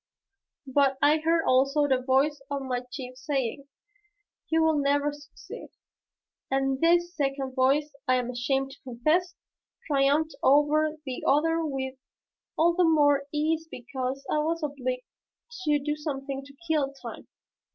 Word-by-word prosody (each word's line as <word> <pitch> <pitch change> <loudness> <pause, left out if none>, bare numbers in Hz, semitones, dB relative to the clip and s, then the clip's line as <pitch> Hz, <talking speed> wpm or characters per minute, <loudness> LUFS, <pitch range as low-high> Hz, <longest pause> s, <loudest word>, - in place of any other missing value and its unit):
But 270 0 +2
I 295 +2 +4
heard 325 +1 +2
also 275 +3 +3
the 260 -2 +2
voice 275 +3 +2
of 280 -1 -3
my 250 -2 -2
chief 255 -2 -7
saying, 275 0 -3 0.8
"You 320 0 +3
will 320 -2 +3
never 285 +1 +1
succeed." 290 0 -11 0.8
And 270 0 0
this 345 +1 +3
second 275 -2 -2
voice, 275 +3 +2
I 255 - +4
am 250 -1 -1
ashamed 270 +2 -1
to - - -15
confess, 310 +9 0 0.5
triumphed 290 +2 +2
over 300 +2 +3
the 260 -2 -5
other 325 +3 +3
with 265 -3 -4 0.6
all 340 +2 +4
the 360 +1 +2
more 290 -4 +3
ease 315 +2 0
because 255 +1 -5
I 305 - +1
was 325 +2 -1
obliged 255 -3 -3 0.6
to 300 -1 +3
do 295 +1 -2
something 275 -2 -4
to 280 0 -15
kill 300 -4 +1
time. 275 - -10
285 Hz, 140 wpm, -27 LUFS, 265-305 Hz, 0.8 s, I